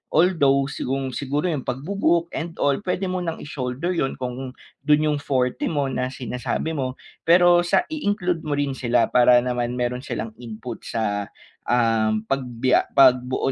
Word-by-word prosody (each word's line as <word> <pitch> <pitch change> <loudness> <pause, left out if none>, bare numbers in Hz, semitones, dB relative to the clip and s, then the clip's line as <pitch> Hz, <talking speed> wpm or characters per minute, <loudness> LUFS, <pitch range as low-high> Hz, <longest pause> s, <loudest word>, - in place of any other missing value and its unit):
Although 145 -6 +3
sigung 135 -1 -3
siguro 145 +5 -1
'yong 145 -5 -2
pagbu-book 170 +5 0
and 165 +1 -4
all 140 -1 +3
puwede 185 0 -1
mo 185 0 -1
nang 165 -1 -4
i-shoulder 135 +2 -4
'yon 135 -5 -1
kung 125 +1 -5 0.3
do'n 150 0 +4
'yong 150 - -1
forte 130 -3 -1
mo 145 -3 0
na 125 0 -1
sinasabi 125 +3 -3
mo 130 -3 -2 0.3
pero 175 0 +6
sa 175 - +3
i-include 205 - -1
mo 150 -1 -1
rin 145 -1 0
sila 120 -3 +1
para 125 0 +6
naman 125 -1 -2
meron 125 0 -1
silang 115 -3 -4
input 115 0 -7
sa, 105 -3 -2 0.4
um, 110 -2 +2
pagbiya 130 -2 +1
pagbuo 130 -1 +4
135 Hz, 155 wpm, -23 LUFS, 125-160 Hz, 0.4 s, pero